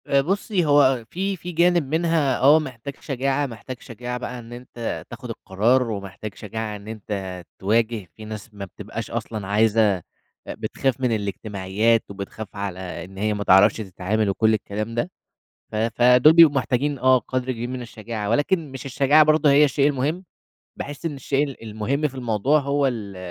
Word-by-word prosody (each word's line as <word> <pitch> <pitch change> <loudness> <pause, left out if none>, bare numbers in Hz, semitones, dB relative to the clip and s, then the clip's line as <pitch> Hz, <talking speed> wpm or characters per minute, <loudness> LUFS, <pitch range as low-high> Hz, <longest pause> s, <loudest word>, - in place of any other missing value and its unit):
آآ، 140 0 +4
بُصّي، 190 +3 0
هو 145 -1 +5
أ 130 -3 +3
في 190 - -3
في 180 +1 -7
جانب 175 0 +3
منها 160 -6 +2
آه 145 +4 +6
محتاج 135 -2 -7
شجاعة، 135 +1 -1
محتاج 125 0 -8
شجاعة 125 +1 -6
بقى 125 0 -6
إن 120 0 -11
أنت 120 -1 -6
تاخد - - -9
القرار، 115 +6 +1
ومحتاج 100 0 -6
شجاعة 110 0 -5
إن 100 0 -11
أنت 100 -4 -5 0.2
تواجه 110 +1 +1
في 110 - -10
ناس 110 +1 -8
ما 100 -1 -6
بتبقاش 90 - -7
أصلًا 105 -4 -4
عايزة 105 -1 +3
أ 85 - -14 0.4
بتخاف 135 -2 -2
من 125 -2 +1
الاجتماعيات 105 +2 0
وبتخاف 100 +1 -8
على 100 -2 -4 0.3
إن 95 +1 -14
هي 105 +2 0
ما 105 0 -3
تعرفش 95 +2 +6
تتعامل 105 +1 -1
وكل 110 +3 +2
الكلام 110 +2 -3
ده، 160 +10 -1 0.6
ف - - -7
فدول 120 +6 +5
بيبقوا 160 -3 +7
محتاجين 135 +2 0
آه، 130 +1 +5
قدر 130 +1 -3
كبير 120 0 -5
من 130 0 -5
الشجاعة، 110 -2 -6
ولكن 145 +4 +1
مش 135 0 -7
الشجاعة 140 +3 +4
برضو 155 0 +4
هي 145 +1 +6
الشيء 145 0 +3
المهم، 150 +6 -1 0.5
باحس 145 +2 -7
إن 155 - -2
الشيء 140 +2 0
ال 135 - -12
المهم 115 +7 -1
في 135 - -15
الموضوع 125 +3 +1
هو 140 0 +1
ال 105 -7 -4
120 Hz, 175 wpm, -23 LUFS, 105-140 Hz, 0.6 s, بيبقوا